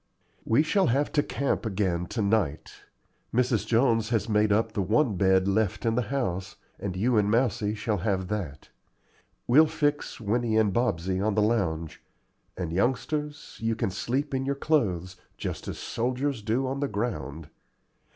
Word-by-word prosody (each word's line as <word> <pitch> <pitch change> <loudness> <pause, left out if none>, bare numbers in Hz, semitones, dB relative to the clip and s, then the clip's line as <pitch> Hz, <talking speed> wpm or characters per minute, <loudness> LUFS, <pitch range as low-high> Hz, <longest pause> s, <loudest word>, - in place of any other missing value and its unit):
"We 115 +7 +4
shall 190 +5 +2
have 140 +5 +1
to 145 - +3
camp 140 -1 -1
again 95 -5 -1
to 110 +2 -2
night. 100 -8 0 0.6
Mrs. 120 -2 +1
Jones 115 -2 +2
has 115 -3 0
made 105 -1 +2
up 110 +2 +2
the 110 -2 -1
one 110 +4 +2
bed 95 0 +3
left 105 +3 0
in 115 - +2
the 125 - +1
house, 95 -9 -2 0.2
and 95 -3 -4
you 115 +5 +2
and 105 0 +1
Mousie 110 -2 +1
shall 105 -1 -1
have 95 0 -1
that. 90 -9 -4 0.8
We'll 150 +6 +6
fix 145 -1 -1
Winnie 115 +1 0
and 105 -3 +3
Bobsey 95 -6 0
on 105 -1 +1
the 105 - +3
lounge; 85 -8 -1 0.6
and, 85 -3 -3
youngsters, 145 - -2
you 115 0 0
can 110 -3 -1
sleep 135 +9 -2
in 130 0 0
your 140 +1 -1
clothes, 95 - 0 0.2
just - - -5
as - - -4
soldiers 130 +1 -2
do 115 +5 0
on 135 +1 -2
the 140 - 0
ground. 85 - -4
110 Hz, 165 wpm, -27 LUFS, 95-125 Hz, 0.8 s, We'll